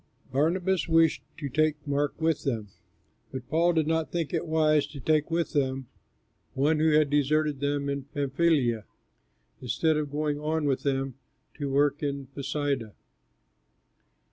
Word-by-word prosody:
Barnabas 175 +7 +1
wished 165 -1 +4 0.2
to 150 -3 -4
take 155 +3 +2
Mark 145 +1 -1
with 160 -2 +1
them, 110 -6 -2 0.6
but 130 -2 -6
Paul 170 +3 +3
did 160 -2 +2
not 160 0 0
think 170 -2 -2
it 170 0 -1
wise 155 -2 +3
to 145 - -10
take 155 +3 +1
with 170 0 -1
them 135 -3 -1 0.7
one 150 +3 +2
who 160 +1 +4
had 150 -2 +4
deserted 145 0 +2
them 140 0 -1
in 140 -1 -3
Pamphylia 140 -5 +1 0.8
instead 155 +5 +1
of 150 -2 -2
going 150 0 -1
on 155 +1 -1
with 135 -2 +1
them 135 -2 -2 0.3
to 145 -2 -4
work 145 +1 +2
in 140 -2 -2
Pisidia. 140 -5 -2
145 Hz, 145 wpm, -27 LUFS, 140-160 Hz, 0.8 s, wished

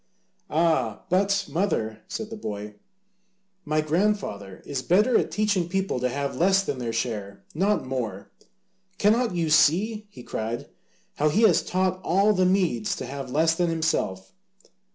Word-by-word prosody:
"Ah, 155 -9 +1
but, 195 +2 +2
mother," 140 - -1
said 220 0 -5
the - - -5
boy, 105 - -6 0.9
"my 155 +1 +1
grandfather 155 - -1
is 140 -2 -3
better 210 - +3
at - - +2
teaching 205 -5 0
people 190 -7 -1
to 125 +1 0
have 140 +2 -3
less 195 +3 +3
than 140 -9 -3
their 120 -2 -3
share, 105 -4 -4
not 195 +3 +1
more. 115 -7 -4 0.7
Cannot 220 0 +2
you 165 -3 0
see," 205 +8 +3
he 125 -11 -12
cried, 115 +1 -4 0.5
"how 150 +1 +3
he 210 +9 +2
has 200 -7 +5
taught 185 0 -1
all 200 +5 +3
the 185 -2 +2
Medes 180 - +1
to - - -6
have 135 +1 -6
less 160 +5 +2
than 175 +1 0
himself? 155 - -1
165 Hz, 155 wpm, -25 LUFS, 125-195 Hz, 0.9 s, has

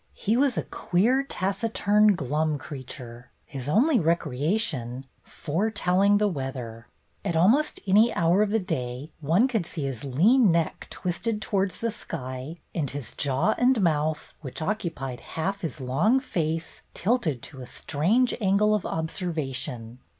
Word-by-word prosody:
He 215 +3 0
was 265 -1 +2
a - - 0
queer, 230 +10 +1
taciturn, 210 -2 +2
glum 150 +1 0
creature, 125 -3 -9 0.2
his 135 -1 -6
only 250 - +4
recreation 150 - -1 0.2
foretelling 200 +3 +1
the 210 0 +2
weather. 130 - -5 0.4
At 170 - -1
almost 230 - +3
any 210 +4 +5
hour 170 +4 +3
of 210 - +2
the 220 - +2
day 130 - -4
one 165 - +3
could 225 -8 0
see 160 -4 -5
his 135 -5 -4
lean 195 - +4
neck 165 -1 -1
twisted 210 +5 -2
towards 195 -2 -1
the 230 0 0
sky, 130 0 -6 0.2
and 150 -6 -1
his 140 -4 -5
jaw 140 +9 +1
and 250 -1 +4
mouth 155 -4 0
— - - -39
which 130 -5 -7
occupied 155 - -3
half 195 +5 -3
his 165 -3 -4
long 150 - +2
face 165 - -3
— - - -41
tilted 185 - 0
to 135 -3 -9
a 125 - -8
strange 210 - +1
angle 205 +2 +3
of 210 -3 0
observation. 135 - -4
170 Hz, 150 wpm, -26 LUFS, 135-210 Hz, 0.4 s, any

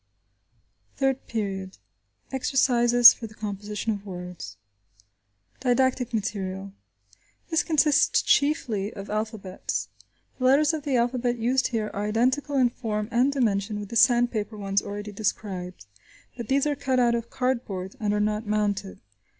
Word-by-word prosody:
THIRD 270 -1 -1
PERIOD: 195 -4 -4 0.5
EXERCISES 245 -2 +6
FOR 225 - -8
THE 215 - -16
COMPOSITION 210 +1 -4
OF 200 -1 -7
WORDS 180 -3 -8 1.0
Didactic 255 -1 +1
Material. 195 -3 -4 0.8
This 325 - +3
consists 305 -2 +3
chiefly 235 -9 +1
of 200 0 -7
alphabets. 195 - -3 0.5
The 255 - -1
letters 285 +4 +4
of 310 -2 -4
the 280 -3 0
alphabet 240 0 0
used 250 +3 +1
here 220 -3 -2
are 205 +1 -2
identical 260 +6 +1
in 250 -2 +3
form 215 -3 -3
and 250 +4 +3
dimension 210 -5 0
with 205 -1 -7
the - - -7
sandpaper 230 -2 +3
ones 195 -1 0
already 205 +1 -6
described, 190 - -4 0.5
but 235 -3 -6
these 275 +2 +2
are 295 -1 0
cut 265 -2 0
out 240 -1 +3
of 235 0 -3
cardboard 235 -8 -3
and 210 -2 0
are 210 - 0
not 210 +1 -1
mounted. 205 -2 -1
225 Hz, 140 wpm, -25 LUFS, 205-255 Hz, 1.0 s, EXERCISES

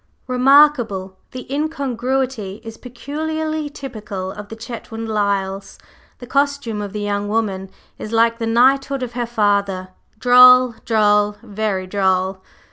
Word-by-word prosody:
"Re 255 -1 -3
markable! 245 -9 +3
The 255 -1 -8
incongruity 265 -7 -2
is 225 -1 -9
peculiarly 310 +4 -4
typical 215 -9 -7
of 205 0 -10
the 225 - -7
Chetwynd 225 0 -7
Lyles. 200 -2 -2 0.4
The 245 - -10
costume 280 -5 -1
of 205 -1 -5
the 210 +1 -5
young 205 0 -2
woman 200 -3 -2 0.3
is 215 - -7
like 230 +1 +2
the 225 - -2
knighthood 270 +3 +2
of 245 -1 -6
her 240 -1 -3
father, 200 -4 0 0.3
droll, 250 +1 +7
droll, 210 -2 +2
very 210 -3 -3
droll!" 190 0 0
225 Hz, 130 wpm, -19 LUFS, 205-255 Hz, 0.4 s, droll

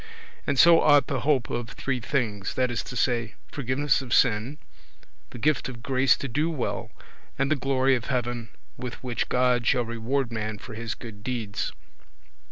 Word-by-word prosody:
And 140 - +1
so 170 +3 +8
ought 145 -3 +6
the 135 -1 -2
hope 140 -5 +1
of 120 -1 -3
three 130 +6 -2
things, 110 -6 -2
that 125 -1 +1
is 120 - -1
to - - -7
say, 115 -3 0 0.2
forgiveness 135 +1 +1
of 125 -2 0
sin, 125 +4 +2 0.7
the - - -10
gift 145 +2 +1
of 120 -3 -9
grace 130 -1 +3
to 140 - -4
do 150 +6 0
well, 150 -7 -3 0.5
and 135 +2 0
the - - +5
glory 135 0 +2
of 120 -3 -1
heaven 120 -3 -2 0.3
with 125 -1 -5
which 125 -2 -2
God 125 -1 +2
shall 120 -2 +3
reward 115 +3 -1
man 110 -1 -3
for 115 - -10
his 115 0 -4
good 105 -4 -10
deeds. 115 -5 -3
125 Hz, 175 wpm, -26 LUFS, 115-135 Hz, 0.7 s, so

